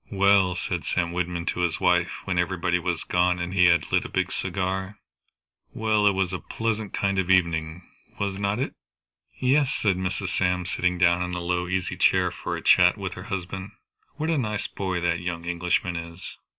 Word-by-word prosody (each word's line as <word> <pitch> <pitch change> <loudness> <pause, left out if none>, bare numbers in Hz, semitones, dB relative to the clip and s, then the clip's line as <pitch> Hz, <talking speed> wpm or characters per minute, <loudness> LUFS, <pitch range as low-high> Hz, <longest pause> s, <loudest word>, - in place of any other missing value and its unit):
"Well," 100 -2 +4
said 90 -1 -3
Sam 85 -2 -1
Wyndham 90 -1 -2
to - - -2
his 85 -2 0
wife 90 -2 +3 0.2
when 90 -2 0
everybody 90 0 0
was 85 -1 -2
gone, 90 0 +2
and 85 +1 -4
he 90 -2 +5
had 85 -1 +3
lit - - +3
a - - -7
big - - -1
cigar; 95 +2 -2 0.8
"well, 110 -2 +2
it 100 - +4
was 95 -1 0
a 95 - -2
pleasant 110 -2 -3
kind 100 -1 0
of 95 -1 -1
an 95 - +8
evening, 85 -1 -1 0.4
was 100 -1 -2
not 100 +1 0
it?" 130 - -2 0.7
"Yes," 135 +2 +3
said 100 -4 +1
Mrs. 95 +1 -2
Sam, 90 0 0
sitting 90 0 0
down 85 0 +3
in 90 0 -2
a - - -2
low 90 0 -1
easy 90 -1 -2
chair 90 0 +3
for 90 - -4
a - - -9
chat - - +5
with - - -4
her - - -9
husband. 95 +1 -5 0.4
"What 155 +2 -1
a 160 - +1
nice 105 -4 -2
boy 95 -3 -3
that 85 0 +1
young 85 -1 -4
Englishman 85 0 0
is." 85 +1 -7
90 Hz, 200 wpm, -25 LUFS, 90-95 Hz, 0.8 s, an